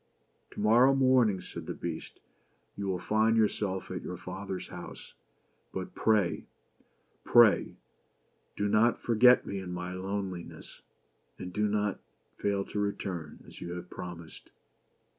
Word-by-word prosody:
"To - - -10
morrow 120 +6 +5
morning," 130 -8 +4
said - - -8
the - - -4
Beast, 85 -2 -6 0.6
"you 100 -1 -4
will 95 -1 0
find 110 +5 +2
yourself 105 -3 0
at - - -4
your 90 - -6
father's 95 +1 -6
house. - - -9 0.6
But - - -5
pray 105 -5 +1 0.4
— - - -41
pray 120 -3 +5 0.4
— - - -43
do 105 - 0
not 110 +3 +3
forget 125 +2 +5
me 100 - -4
in 95 -2 -6
my 90 +1 -4
loneliness, 95 -1 -6 0.6
and 90 0 -7
do 105 +2 +1
not 105 -1 0 0.4
fail 100 -1 0
to 105 - -4
return 95 -6 -4
as - - -13
you 85 - -5
have 90 0 -8
promised." 85 -2 -9
100 Hz, 140 wpm, -30 LUFS, 90-110 Hz, 0.6 s, morrow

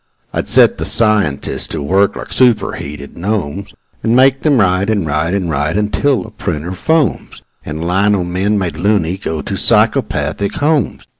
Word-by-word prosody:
I'd - - -2
set - - +5
the - - -2
scientists 105 -11 +1
to 75 - -5
work 95 +6 +2
like - - -7
superheated 85 - -1
gnomes, 100 -1 -3 0.3
And 115 +1 +1
make 135 +1 +4
them 150 -4 +2
write 95 0 +2
and 105 -5 0
write 75 +4 -1
and 95 -3 -2
write 75 +3 -1
until 105 +2 0
the 110 - -11
printer 85 -5 -4
foams 160 - -1 0.2
And 80 +3 -5
lino 95 +1 +2
men, 95 +4 -1
made 90 -5 -3
"loony", 95 -1 0
go 80 -4 -4
to - - -4
psychopathic 80 +7 +1
homes. 150 -5 0
95 Hz, 160 wpm, -15 LUFS, 80-110 Hz, 0.3 s, set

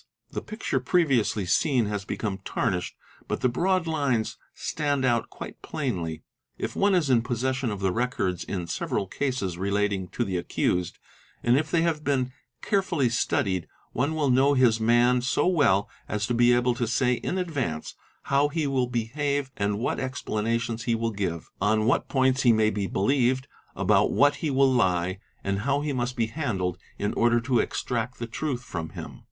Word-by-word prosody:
The - - -3
picture 215 - -3
e 150 +8 +3
eviously 115 - +1
seen 125 - +2
has 105 -1 -3
become 100 -2 -3
tarnished, 90 -1 -2 0.3
but - - -2
the 125 - +3
broad 180 +7 +1
lines 140 -8 0 0.2
stand 145 -3 -1
out 120 -2 +1
quite - - -9
p - - -9
jlainly. 90 - -2 0.3
If - - -4
one 200 -1 +3
is 155 -7 +2
in 120 -2 +5
possession 130 +2 -1
of 100 -2 -4
the 95 -1 +2
records 95 -6 -1
in 90 -3 -4
several 90 +3 -2
cases 100 -7 -2
relating 100 -1 0
to 120 - -2
"the 95 -3 -2
accused, 90 0 -1 0.5
and 120 +1 +4
if 155 +3 +1
they 165 +1 +2
have 160 -3 0
been 130 -3 0 0.3
carefully 185 - +1
studied, 95 -5 0 0.2
one 145 +6 0
will 145 -4 +2
know 135 +3 +4
his 120 -4 +4
man 120 +2 +4
so 125 - +1
well 145 - +3 0.2
as 105 0 -1
to 120 - -1
be 120 +1 +5
able 120 0 +3
to 120 -1 -2
say 125 +2 +2
in 175 +8 -2
advance 140 - -2 0.3
how 140 +1 +3
he 155 +1 -1
will 130 -3 +1
behave 135 +4 -1
and 100 -1 0
what 115 - -1
Ber 130 - -1
etiations 115 -1 -2
he 115 - +2
will 115 0 -1
give, 95 -5 -3
on 110 +2 +2
what 120 - +1
points 130 0 +2
he 120 - +5
may 110 -1 +3
be 100 -1 -2
believed, 130 +5 +1 0.3
about - - +3
what 145 +1 +4
he 155 - -2
will 135 -1 +4
lie, 95 -4 +1 0.2
and 100 0 -1
how 140 +6 0
he 145 -1 -2
must 125 0 -2
be 115 -2 +1
handled 110 - -2 0.2
in 105 - -1
order 120 0 +3
to 120 0 +1
extract 125 +1 -2
the 120 - -4
truth 125 +1 -3
from 85 -7 -5
him. - - -9
120 Hz, 185 wpm, -26 LUFS, 105-140 Hz, 0.5 s, in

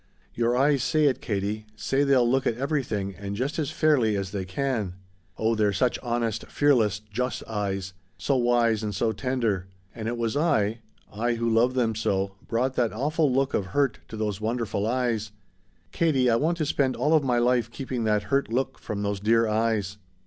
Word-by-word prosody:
Your 120 +1 +1
eyes 140 0 +3
say 155 +4 +2
it, 135 -3 +2
Katie 105 0 -3
say 135 +5 0
they'll 135 -4 +4
look 130 +2 +2
at 115 - 0
everything, 120 -8 -2
and 100 0 -5
just 135 +9 -2
as 145 -3 -1
fairly 140 -10 +2
as 95 -1 -3
they 95 -2 -3
can. 105 -2 -2 0.4
Oh 110 +1 +1
they're 105 -2 +2
such 120 +5 +1
honest, 115 -2 -2
fearless, 125 -9 +2
just 115 +4 -3
eyes 100 -3 -3 0.2
so 110 +10 0
wise 120 -3 +2
and 105 -2 -3
so 110 +3 +1
tender. 110 -5 -1 0.3
And 110 -2 -5
it 120 +1 -2
was 115 +1 -1
I 120 -9 +1 0.3
I 120 +3 0
who 115 0 -1
love 115 +3 +3
them 115 -3 +1
so 100 -3 -1 0.2
brought 125 +3 0
that 120 -3 +2
awful 150 +5 +1
look 135 +2 +1
of 95 - 0
hurt 140 -6 +2
to 110 - -8
those 105 -2 -2
wonderful 110 -2 -1
eyes. 115 -3 -1 0.6
Katie 135 -7 +2
I - - +4
want 160 +8 +1
to 155 - 0
spend 140 -3 +1
all 145 +6 +1
of 155 -2 +4
my 125 -2 +1
life 120 -1 +2
keeping 130 -1 -4
that 105 -1 +2
hurt 135 +4 0
look 130 +3 -1
from 105 -1 -4
those 100 -1 -1
dear 115 +2 +3
eyes! 110 -2 0
115 Hz, 190 wpm, -26 LUFS, 105-130 Hz, 0.6 s, they'll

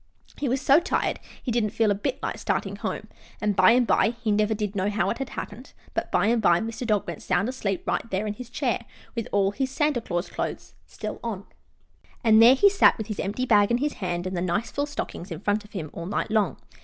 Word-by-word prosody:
He 280 - -1
was 260 +3 +1
so 275 +3 +6
tired 345 - -1 0.2
he 250 - -2
didn't 225 -2 +1
feel 220 0 +2
a - - +4
bit 200 - -2
like - - -3
starting - - -1
home, - - -4 0.3
and 210 -2 0
by 185 +1 +6
and 245 0 +4
by 230 +1 +2
he 230 -3 -1
never 215 +1 +2
did 210 -1 -3
know 195 +1 +1
how 205 +1 0
it 235 - -4
happened 235 +6 -8 0.2
but - - -2
by - - +3
and 230 +1 +2
by 175 -4 +4
Mr. 225 +2 -4
Dog 210 -3 +1
went 170 -3 -6
sound 200 - +1
asleep 210 -7 -2
right 230 - -1
there 190 +1 -1
in 210 - -2
his 240 +2 -9
chair, 245 -2 -1 0.3
with 230 -2 -3
all 195 -1 +2
his 260 +5 -2
Santa 290 -2 +1
Claus 175 -4 -2
clothes - - -5 0.5
on. 210 -4 -4 0.8
And 220 -1 +6
there 240 +3 +8
he 400 - +6
sat, 400 0 +5
with 220 - -4
his 210 - -4
empty 210 +6 -1
bag 205 -4 +4
in 235 - +3
his 290 +3 -1
hand 175 -2 -3
and 185 0 -3
the 175 - -1
nice 185 +6 -1
full 285 +1 -1
stockings 200 -9 -5
in 165 - -5
front 210 +1 0
of 210 - -18
him, 160 -7 -5
all 170 0 -6
night 205 +2 -2
long. 215 -2 +1
215 Hz, 240 wpm, -25 LUFS, 200-240 Hz, 0.8 s, there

